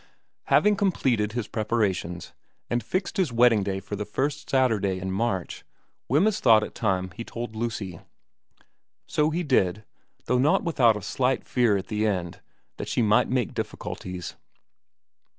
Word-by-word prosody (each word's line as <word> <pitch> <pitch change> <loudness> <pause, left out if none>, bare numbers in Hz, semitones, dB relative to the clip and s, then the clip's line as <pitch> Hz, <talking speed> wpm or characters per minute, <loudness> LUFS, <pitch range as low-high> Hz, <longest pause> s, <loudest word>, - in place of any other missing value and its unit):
Having 210 -1 +4
completed 125 - +1
his 120 -3 -3
preparations, 105 -7 -2 0.4
and 120 -1 0
fixed 185 - -2
his 180 -9 +1
wedding 115 -2 +4
day 95 -1 -2
for 100 +2 -6
the 105 - -3
first 140 +7 -3
Saturday 110 -8 +2
in 95 0 -4
March, 95 -2 -2 0.5
Wemyss 185 - +3
thought 110 -3 +5
it - - -6
time 95 -4 -1
he 110 +5 -7
told 115 -1 -6
Lucy; 110 -6 -4 1.1
so 150 0 +1
he 170 +3 -1
did, 105 - +1 0.4
though 125 - +1
not 150 +9 +3
without 125 - +3
a 105 - -8
slight 130 +5 0
fear 120 -5 +2
at 95 - -5
the 110 0 -1
end 90 -5 -3 0.4
that - - -5
she 120 - +1
might 105 0 +3
make 125 -4 0
difficulties. 90 -2 -5
115 Hz, 150 wpm, -26 LUFS, 100-130 Hz, 1.1 s, thought